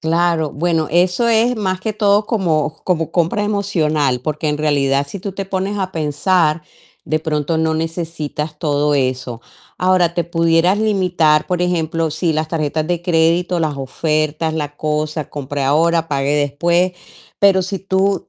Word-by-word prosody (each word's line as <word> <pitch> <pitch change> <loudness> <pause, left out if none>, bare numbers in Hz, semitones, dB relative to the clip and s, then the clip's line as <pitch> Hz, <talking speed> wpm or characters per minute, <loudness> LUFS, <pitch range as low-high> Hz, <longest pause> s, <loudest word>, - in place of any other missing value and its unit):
Claro, 165 -1 +1
bueno, 165 0 0
eso 180 +7 +2
es 230 +2 +3
más 185 -3 -2
que 215 +2 -3
todo 205 0 +2
como 160 - 0
como 165 -4 0
compra 175 +5 0
emocional, 155 -11 0
porque 150 +2 -2
en 150 - -1
realidad, 140 -2 +1
si 200 - -6
tú 195 +1 -5
te 195 0 -5
pones 195 +2 -2
a 190 -1 -3
pensar, 155 +1 +1 0.4
de 155 - +1
pronto 155 0 -1
no 160 0 +1
necesitas 160 -2 -4
todo 145 -1 +1
eso. 130 -3 -2 0.4
Ahora, 180 -2 +3
te 170 - 0
pudieras 165 +3 +2
limitar, 180 -8 +2
por 180 -1 -1
ejemplo, 165 -2 0
sí, 160 +2 0
las 155 0 -1
tarjetas 155 -1 -1
de 175 0 -1
crédito, 175 +1 +1
las 155 -3 -1
ofertas, 155 +3 -1
la 145 -2 -4
cosa, 155 0 -2
compre 145 0 -4
ahora, 165 +4 +2
pague 140 -1 0
después, 170 +6 +1 0.5
pero 195 -2 +4
si 190 +1 -4
tú 195 +1 0
165 Hz, 160 wpm, -18 LUFS, 150-185 Hz, 0.5 s, pero